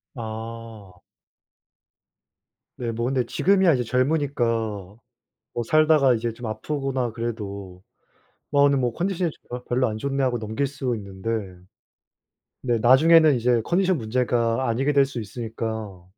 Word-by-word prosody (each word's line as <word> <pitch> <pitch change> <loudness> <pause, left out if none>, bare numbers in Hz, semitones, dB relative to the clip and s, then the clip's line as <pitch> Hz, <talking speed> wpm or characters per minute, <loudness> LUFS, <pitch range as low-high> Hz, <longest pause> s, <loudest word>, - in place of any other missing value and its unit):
아. 110 -4 -8 1.8
네 120 -2 -3
뭐 115 +1 -3
근데 130 -1 0
지금이야 190 - +3
이제 125 -2 0
젊으니까 135 +3 0 1.1
뭐 120 - -1
살다가 155 -3 +4
이제 115 0 -2
좀 120 +1 -8
아프거나 130 +1 -2
그래도 100 -5 -6 0.7
'뭐 145 -1 +4
오늘 140 -1 +4
뭐 125 -2 +1
좀 - - -18
컨디션이 180 -1 0 0.4
별로 125 +1 +1
안 110 0 -4
좋네.' 140 +3 -1
하고 125 -2 +1
넘길 110 +5 -2
수 135 -2 -3
있는데 100 0 -8 1.3
근데 120 -2 0
나중에는 155 +6 +6
이제 120 -1 +2
컨디션 185 - +1
문제가 120 +1 0
아니게 130 +5 +1
될 140 -1 +5
수 135 -3 -6
있으니까 110 -3 -6
120 Hz, 275 characters per minute, -24 LUFS, 115-140 Hz, 1.8 s, 나중에는